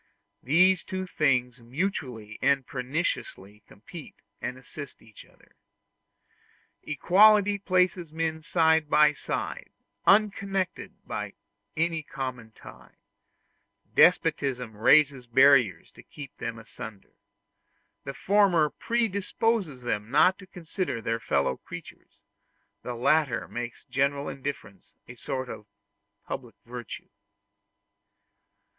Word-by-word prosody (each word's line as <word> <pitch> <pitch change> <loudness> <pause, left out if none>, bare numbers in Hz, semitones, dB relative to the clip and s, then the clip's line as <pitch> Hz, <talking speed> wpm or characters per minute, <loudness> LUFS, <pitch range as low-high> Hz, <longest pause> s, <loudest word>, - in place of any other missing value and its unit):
These 180 +6 +4
two 185 -1 -4
things 130 -7 0
mutually 125 - -4
and 135 -1 +2
perniciously 125 - -4
complete 150 - -12 0.3
and 125 0 -4
assist 140 +2 -10
each 110 -1 -15
other. - - -26 1.3
Equality 205 +6 +4
places 185 -3 +1
men 160 0 -2
side 160 -1 +2
by 150 0 +5
side, - - -5 0.4
unconnected 195 -2 +1
by - - -5 0.4
any 165 0 0
common 130 -5 -6
tie; - - -15 1.0
despotism 135 -9 +3
raises 135 +3 +4
barriers 125 -8 +4
to - - -15
keep 140 -3 -11
them 115 -1 -5
asunder; 105 -2 -11 0.9
the 135 -1 -6
former 185 -7 +3
predisposes 210 - -1
them 105 -3 -2
not 180 +8 +4
to 195 - -13
consider 175 - -4
their 115 0 -2
fellow 70 - 0
creatures, - - -12 0.6
the 125 - -5
latter 135 0 +1
makes 120 0 -6
general 140 +1 0
indifference 130 -9 -7
a 125 - -9
sort 130 +2 -4
of 105 -3 -9 0.6
public 120 -3 -7
virtue. 120 -1 -8
140 Hz, 100 wpm, -27 LUFS, 125-180 Hz, 1.3 s, by